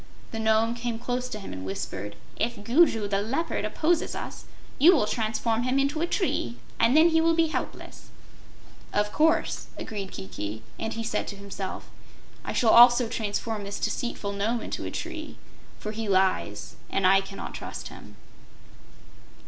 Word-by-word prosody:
The 225 Hz, -, -4 dB
Nome 220 Hz, +1 st, +3 dB
came 235 Hz, -1 st, -3 dB
close 250 Hz, +1 st, -2 dB
to 225 Hz, -, -5 dB
him 195 Hz, -, -7 dB
and 95 Hz, 0 st, -6 dB
whispered: 100 Hz, +1 st, -5 dB, 0.2 s
"If 230 Hz, -2 st, -2 dB
Gugu 235 Hz, -3 st, +4 dB
the 200 Hz, 0 st, 0 dB
Leopard 270 Hz, +11 st, -1 dB
opposes 330 Hz, +1 st, +1 dB
us, -, -, -6 dB, 0.3 s
you 340 Hz, +7 st, +8 dB
will 260 Hz, -, +3 dB
transform 225 Hz, +1 st, 0 dB
him 255 Hz, +2 st, +1 dB
into 280 Hz, +3 st, +1 dB
a 340 Hz, -, +1 dB
tree, 120 Hz, -, -1 dB, 0.2 s
and 245 Hz, +6 st, +5 dB
then 325 Hz, +2 st, +7 dB
he 325 Hz, 0 st, +3 dB
will 330 Hz, 0 st, +3 dB
be 325 Hz, -1 st, +3 dB
helpless." -, -, -5 dB, 0.8 s
"Of 210 Hz, 0 st, +1 dB
course," 320 Hz, +2 st, +2 dB
agreed 200 Hz, -3 st, -5 dB
Kiki, 100 Hz, +3 st, -6 dB, 0.2 s
and 225 Hz, -, -2 dB
he 230 Hz, -, -4 dB
said 225 Hz, -, -1 dB
to 200 Hz, -, -5 dB
himself: 200 Hz, -1 st, -6 dB, 0.6 s
"I -, -, -4 dB
shall 225 Hz, -3 st, +3 dB
also 240 Hz, 0 st, +8 dB
transform 220 Hz, -1 st, -2 dB
this 200 Hz, +1 st, -5 dB
deceitful 225 Hz, -4 st, -2 dB
Nome 215 Hz, +4 st, -1 dB
into -, -, -4 dB
a -, -, -3 dB
tree, 325 Hz, -2 st, -6 dB, 0.4 s
for 215 Hz, -, -5 dB
he 220 Hz, -1 st, -4 dB
lies 185 Hz, -, +1 dB
and 195 Hz, -, 0 dB
I 195 Hz, +1 st, +6 dB
cannot 195 Hz, 0 st, -7 dB
trust -, -, -6 dB
him." -, -, -12 dB
225 Hz, 165 wpm, -27 LUFS, 200-255 Hz, 0.8 s, you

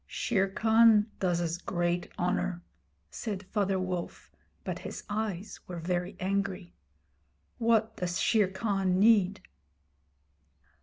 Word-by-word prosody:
'Shere 195 Hz, -4 st, 0 dB
Khan 220 Hz, +1 st, +4 dB
does 175 Hz, -2 st, +1 dB
us 170 Hz, 0 st, -2 dB
great 175 Hz, -1 st, -1 dB
honour,' 180 Hz, 0 st, -1 dB, 0.5 s
said 205 Hz, -4 st, -4 dB
Father 195 Hz, 0 st, 0 dB
Wolf, 185 Hz, -2 st, -4 dB, 0.3 s
but -, -, -4 dB
his -, -, -7 dB
eyes 205 Hz, -2 st, -3 dB
were 180 Hz, -, -6 dB
very 180 Hz, +3 st, -2 dB
angry. 195 Hz, -1 st, -2 dB, 0.9 s
'What 225 Hz, -1 st, +2 dB
does 180 Hz, 0 st, -2 dB
Shere 215 Hz, -4 st, +3 dB
Khan 195 Hz, -2 st, 0 dB
need?' 200 Hz, -2 st, +4 dB
190 Hz, 110 wpm, -29 LUFS, 180-210 Hz, 0.9 s, Khan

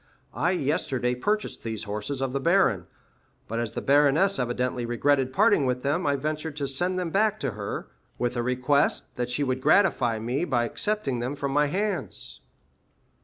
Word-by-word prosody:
I 175 Hz, -, +1 dB
yesterday 135 Hz, -5 st, 0 dB
purchased 210 Hz, +12 st, -2 dB
these 110 Hz, -2 st, -4 dB
horses 105 Hz, +6 st, -4 dB
of 135 Hz, -1 st, -1 dB
the 140 Hz, -, 0 dB
baron; 165 Hz, -, +2 dB, 0.6 s
but 115 Hz, +1 st, -3 dB
as 115 Hz, -1 st, -3 dB
the -, -, -4 dB
baroness 150 Hz, +8 st, +4 dB
evidently 125 Hz, 0 st, -1 dB
regretted 130 Hz, +3 st, +1 dB
parting 135 Hz, +1 st, +3 dB
with 125 Hz, 0 st, -1 dB
them, 150 Hz, +5 st, 0 dB
I 140 Hz, -, +2 dB
ventured 155 Hz, +2 st, -3 dB
to 145 Hz, -, -1 dB
send 175 Hz, +7 st, 0 dB
them 180 Hz, -3 st, -2 dB
back 215 Hz, +2 st, +2 dB
to -, -, -1 dB
her, 100 Hz, -1 st, -5 dB, 0.3 s
with 120 Hz, 0 st, -1 dB
a 120 Hz, -, 0 dB
request 125 Hz, +3 st, +1 dB
that 125 Hz, 0 st, -2 dB
she 125 Hz, +4 st, -1 dB
would 130 Hz, -1 st, -1 dB
gratify 135 Hz, -, +3 dB
me 120 Hz, +7 st, -2 dB
by 125 Hz, -8 st, +1 dB
accepting 145 Hz, -, -1 dB
them 125 Hz, +4 st, -3 dB
from 140 Hz, -1 st, -3 dB
my 145 Hz, +1 st, +3 dB
hands." 200 Hz, +6 st, -3 dB
135 Hz, 175 wpm, -26 LUFS, 125-155 Hz, 0.6 s, baroness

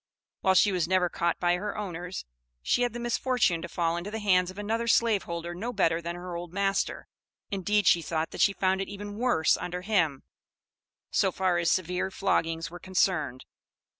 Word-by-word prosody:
While 190 Hz, 0 st, +3 dB
she 200 Hz, +3 st, +5 dB
was 180 Hz, -3 st, 0 dB
never 185 Hz, -1 st, +2 dB
caught 170 Hz, 0 st, -1 dB
by 175 Hz, 0 st, +2 dB
her 205 Hz, +2 st, -4 dB
owners, 180 Hz, -3 st, -5 dB, 0.4 s
she 245 Hz, -, +2 dB
had 245 Hz, -2 st, +1 dB
the 240 Hz, -, -5 dB
misfortune 240 Hz, -7 st, +1 dB
to -, -, -6 dB
fall 170 Hz, -1 st, 0 dB
into 175 Hz, +4 st, -5 dB
the 220 Hz, -, -4 dB
hands 185 Hz, -4 st, +3 dB
of 185 Hz, -, -10 dB
another 225 Hz, +3 st, -2 dB
slaveholder 180 Hz, -8 st, +1 dB
no 220 Hz, +8 st, -4 dB
better 165 Hz, -7 st, +1 dB
than 170 Hz, +1 st, -4 dB
her 175 Hz, 0 st, -6 dB
old 170 Hz, 0 st, -6 dB
master, 195 Hz, +1 st, -1 dB, 0.4 s
indeed 205 Hz, +1 st, +1 dB
she 170 Hz, -, +5 dB
thought 160 Hz, 0 st, -2 dB
that -, -, -4 dB
she 200 Hz, -, +5 dB
found 190 Hz, 0 st, +1 dB
it 195 Hz, -, -4 dB
even 205 Hz, +1 st, -7 dB
worse 240 Hz, -11 st, +3 dB
under 180 Hz, +1 st, -5 dB
him, 175 Hz, -9 st, +1 dB, 0.9 s
so -, -, +2 dB
far 185 Hz, -2 st, +1 dB
as 170 Hz, -, +1 dB
severe 180 Hz, +1 st, 0 dB
floggings 165 Hz, -4 st, -1 dB
were 175 Hz, -, -9 dB
concerned. 175 Hz, -8 st, 0 dB
185 Hz, 190 wpm, -28 LUFS, 170-205 Hz, 0.9 s, she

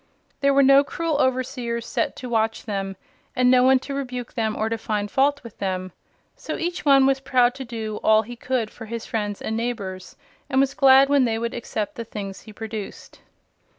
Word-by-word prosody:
There 280 Hz, 0 st, +3 dB
were 275 Hz, 0 st, +5 dB
no 275 Hz, +1 st, +7 dB
cruel 325 Hz, -1 st, -2 dB
overseers 250 Hz, -2 st, -1 dB
set -, -, -2 dB
to 255 Hz, -, -7 dB
watch 225 Hz, -2 st, 0 dB
them, 195 Hz, -3 st, -3 dB, 0.4 s
and 250 Hz, 0 st, +4 dB
no 255 Hz, -1 st, +6 dB
one 260 Hz, +1 st, +5 dB
to 280 Hz, -, -6 dB
rebuke 250 Hz, -3 st, -5 dB
them 220 Hz, -2 st, -1 dB
or 220 Hz, -, -1 dB
to 225 Hz, 0 st, -2 dB
find 210 Hz, -2 st, -2 dB
fault 285 Hz, +1 st, +2 dB
with 235 Hz, -3 st, -12 dB
them. 185 Hz, -1 st, -3 dB, 0.4 s
So -, -, -5 dB
each 345 Hz, +1 st, -3 dB
one 275 Hz, -2 st, +6 dB
was 270 Hz, 0 st, +2 dB
proud 250 Hz, -2 st, +2 dB
to 265 Hz, 0 st, -7 dB
do 220 Hz, -3 st, -5 dB
all 220 Hz, 0 st, +5 dB
he 240 Hz, +3 st, -9 dB
could 240 Hz, -2 st, -2 dB
for 225 Hz, -, -10 dB
his 230 Hz, 0 st, -5 dB
friends 205 Hz, -2 st, -3 dB
and 220 Hz, -, -2 dB
neighbors, 200 Hz, -6 st, -4 dB, 0.3 s
and 265 Hz, -1 st, +2 dB
was 275 Hz, 0 st, +2 dB
glad 270 Hz, 0 st, +6 dB
when 280 Hz, -2 st, +4 dB
they 225 Hz, -2 st, 0 dB
would 230 Hz, +1 st, -3 dB
accept 220 Hz, -3 st, -4 dB
the 230 Hz, -, -3 dB
things 200 Hz, -3 st, -7 dB
he 220 Hz, -, -13 dB
produced. 220 Hz, -1 st, -8 dB
235 Hz, 205 wpm, -23 LUFS, 220-265 Hz, 0.4 s, no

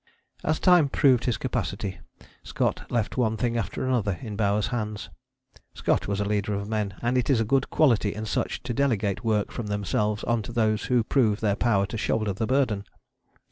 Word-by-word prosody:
As 155 Hz, 0 st, 0 dB
time 175 Hz, -6 st, +5 dB
proved 130 Hz, -4 st, +3 dB
his 120 Hz, -, +1 dB
capacity 95 Hz, -2 st, -3 dB, 0.4 s
Scott -, -, -2 dB
left 120 Hz, -1 st, -1 dB
one 110 Hz, -3 st, +1 dB
thing 120 Hz, +1 st, -1 dB
after 115 Hz, +2 st, -2 dB
another 110 Hz, -8 st, 0 dB
in 110 Hz, -4 st, -5 dB
Bowers' 105 Hz, 0 st, +1 dB
hands. 105 Hz, -5 st, -4 dB, 0.6 s
Scott -, -, 0 dB
was 100 Hz, 0 st, -1 dB
a 100 Hz, -, 0 dB
leader 105 Hz, 0 st, -1 dB
of 100 Hz, 0 st, -4 dB
men, 105 Hz, -3 st, -2 dB
and 125 Hz, +2 st, +2 dB
it 125 Hz, -, -2 dB
is 130 Hz, -5 st, +4 dB
a 115 Hz, -, +1 dB
good 135 Hz, +4 st, +1 dB
quality 115 Hz, -9 st, +3 dB
in 110 Hz, +1 st, -4 dB
such -, -, -2 dB
to 120 Hz, -, -3 dB
delegate 115 Hz, -7 st, 0 dB
work 110 Hz, -3 st, 0 dB
from 115 Hz, -, -5 dB
themselves 105 Hz, +1 st, -1 dB
on 120 Hz, -1 st, +1 dB
to 105 Hz, -, -7 dB
those 110 Hz, -2 st, +1 dB
who 125 Hz, -3 st, +2 dB
prove 110 Hz, -4 st, +2 dB
their 105 Hz, -3 st, +1 dB
power 105 Hz, -4 st, +2 dB
to 110 Hz, +3 st, -5 dB
shoulder 110 Hz, -2 st, 0 dB
the 110 Hz, +4 st, -2 dB
burden. 125 Hz, -7 st, +1 dB
110 Hz, 195 wpm, -26 LUFS, 105-120 Hz, 0.6 s, time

